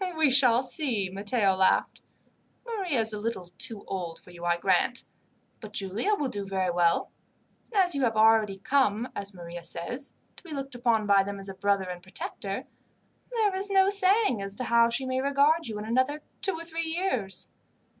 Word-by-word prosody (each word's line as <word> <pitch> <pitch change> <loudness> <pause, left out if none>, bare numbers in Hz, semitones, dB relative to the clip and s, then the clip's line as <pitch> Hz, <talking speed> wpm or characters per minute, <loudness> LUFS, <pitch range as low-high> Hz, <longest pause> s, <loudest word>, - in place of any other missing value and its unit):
"We 310 -4 +4
shall 255 -2 +6
see," 250 - -1
Matteo 200 +1 +1
laughed. 190 0 +2 0.6
"Maria 385 - -1
is 220 0 +3
a 210 - -4
little 205 -5 -4
too 220 -3 -2
old 175 -4 -5
for 180 - -16
you, 175 -1 -12
I 175 0 +2
grant, - - +1 0.6
but 215 -1 -10
Giulia 210 - 0
will 295 -7 -2
do 205 -5 -4
very 190 -2 -1
well; 170 -1 +1 0.6
and 420 - +1
as 360 - +1
you 280 - -2
have 225 -4 +1
already 215 -2 +4
come, 235 +1 +1
as 200 -1 -6
Maria 170 -1 -8
says, 245 +11 -6 0.2
to - - -15
be 335 -4 -8
looked 275 -1 -5
upon 235 -3 +1
by 200 -1 +5
them 200 +1 -4
as 195 0 -6
a - - -5
brother 200 0 +1
and 180 -1 -6
protector, 320 - -4 0.7
there 435 -5 +1
is 390 +2 -1
no 390 0 +4
saying 395 - +3
as 195 0 -5
to 255 - -4
how 235 -1 +4
she 250 +3 -2
may 260 0 -1
regard 280 +3 +2
you 215 -2 -5
in 210 - -5
another 260 +6 0 0.2
two 385 - +2
or 330 - -6
three 330 0 -3
years." 290 - -1
230 Hz, 195 wpm, -27 LUFS, 195-290 Hz, 0.7 s, shall